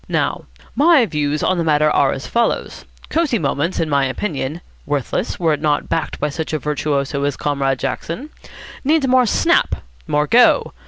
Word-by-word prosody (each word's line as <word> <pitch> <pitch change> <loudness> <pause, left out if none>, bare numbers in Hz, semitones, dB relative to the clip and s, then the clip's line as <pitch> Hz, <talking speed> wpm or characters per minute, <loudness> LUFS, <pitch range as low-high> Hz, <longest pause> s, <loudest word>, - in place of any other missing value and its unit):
Now, - - -1 0.3
my 300 -4 +5
views 150 -4 -2
on 185 -1 +1
the - - +1
matter 150 -1 +3
are 140 -2 +3
as 135 - -5
follows. 235 -1 -1 0.3
Cosy 310 -7 +1
Moments, 160 +1 -1
in 165 - 0
my 140 -2 +2
opinion 150 0 -4 0.3
(worthless, 145 -3 -2
were 165 -3 +2
it 150 - -3
not 150 -2 0
backed 165 -1 -2
by 150 - 0
such 160 +2 -5
a - - +1
virtuoso 145 -1 -2
as 145 -1 -1
Comrade 140 -2 0
Jackson), 180 - -4 0.5
needs 300 0 +2
more 255 -1 +4
snap, - - +2 0.3
more 150 0 +1
go. 240 +10 +4
155 Hz, 170 wpm, -19 LUFS, 145-210 Hz, 0.5 s, my